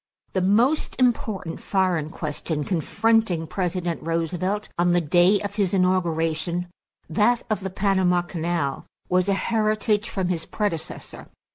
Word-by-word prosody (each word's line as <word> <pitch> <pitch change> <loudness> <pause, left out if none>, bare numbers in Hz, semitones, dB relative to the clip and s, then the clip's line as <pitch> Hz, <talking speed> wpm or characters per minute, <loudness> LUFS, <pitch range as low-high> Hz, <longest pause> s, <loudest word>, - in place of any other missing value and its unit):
= - - -45
The 185 - +1
most 230 +11 +2
important 220 -8 0
foreign 180 -6 0
question 155 -1 -3
confronting 200 +1 +1
President 175 -1 -2
Roosevelt 175 +5 -1
on 175 0 +3
the 175 - +4
day 175 +5 +4
of 205 0 -5
his 200 -2 +1
inauguration, 175 -1 0 0.4
that 215 +8 +2
of 215 - +1
the 190 - -4
Panama 190 -2 +2
Canal, 170 -5 -2 0.2
was 185 +1 +2
a 195 - +3
heritage 215 0 +1
from 190 -3 -2
his 170 -3 -2
predecessor. 205 -7 -4
185 Hz, 135 wpm, -24 LUFS, 170-205 Hz, 0.4 s, the